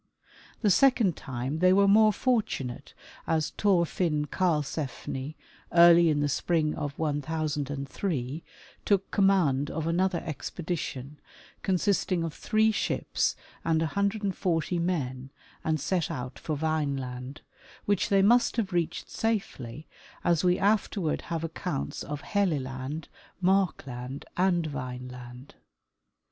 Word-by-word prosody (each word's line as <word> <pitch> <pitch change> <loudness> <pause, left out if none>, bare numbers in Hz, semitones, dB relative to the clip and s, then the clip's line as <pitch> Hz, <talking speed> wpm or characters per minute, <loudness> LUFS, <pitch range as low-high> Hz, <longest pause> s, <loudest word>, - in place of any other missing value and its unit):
The 205 - +5
second 235 - +4
time 130 +4 -4
they 185 +1 +5
were 200 +1 +5
more 215 +2 +6
fortunate, 210 - -1 0.3
as 155 -1 +1
Thorfinn 170 -5 +1
Karlsefni, 150 -4 -2 0.4
early 170 0 +7
in 145 -1 +1
the 145 - +2
spring 155 +2 +1
of 145 -2 -4
1003, 150 -1 -2 0.4
took 195 -2 +1
command 175 -9 +3
of 160 0 -3
another 175 +2 +1
expedition, 150 -3 -5 0.4
consisting 185 -2 +1
of 165 -2 -3
three 220 0 +2
ships 215 - 0 0.3
and 160 -1 +2
140 190 -2 0
men, 135 -7 -2 0.3
and 155 -1 0
set 175 +3 0
out 125 -5 -5
for 155 - -3
Vineland, 140 -3 -2 0.4
which 205 -2 +1
they 195 -1 +4
must 240 +3 +4
have 205 -6 -1
reached 175 -1 -1
safely, 190 - -3 0.4
as 170 -1 +2
we 180 0 +3
afterward 200 -4 +1
have 165 -1 -2
accounts 165 -2 -4
of 145 -1 -5
Helle 200 -6 +1
land, 135 +4 -5 0.3
Markland 140 -9 0
and 175 -2 +2
Vineland. 125 -2 -7
160 Hz, 115 wpm, -28 LUFS, 140-190 Hz, 0.4 s, early